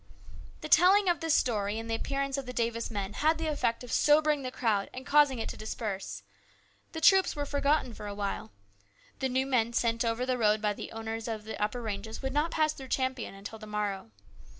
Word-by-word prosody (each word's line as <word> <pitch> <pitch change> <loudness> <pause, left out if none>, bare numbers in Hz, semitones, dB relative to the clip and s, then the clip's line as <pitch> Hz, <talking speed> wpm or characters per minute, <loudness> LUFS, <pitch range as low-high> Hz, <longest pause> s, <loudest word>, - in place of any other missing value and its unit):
The - - -5
telling 385 +3 +6
of 345 -3 +2
this 325 -1 +2
story 210 -3 +1
and 225 0 -5
the 225 - -2
appearance 275 +4 -2
of 275 -2 -4
the 250 - -5
Davis 230 -1 -1
men 200 -2 -4
had 315 +2 +2
the 325 - -3
effect 270 -6 -1
of 245 - -8
sobering 300 0 +4
the 255 - -3
crowd 225 -6 0
and 260 +1 -7
causing 290 -3 +4
it 225 - -3
to - - -7
disperse. 195 - -5 0.7
The 320 - -5
troops 380 +3 +5
were 290 -1 -2
forgotten 285 -3 +1
for 210 - -8
a 205 - -5
while. 200 - -3 0.7
The 265 - 0
new 260 +1 +1
men 235 -3 +1
sent 230 0 +1
over 230 +2 0
the 255 -1 -1
road 215 -1 +3
by 210 -1 0
the - - -8
owners 225 0 -5
of 220 -2 -4
the 220 0 -7
upper 235 +3 -2
ranges 220 +1 -5
would 265 0 -2
not 300 +3 +1
pass 310 -1 +1
through 270 -3 -10
Champion 260 -5 -2
until 200 +3 -9
the 215 - -10
morrow. 205 - -3
235 Hz, 220 wpm, -30 LUFS, 215-280 Hz, 0.7 s, telling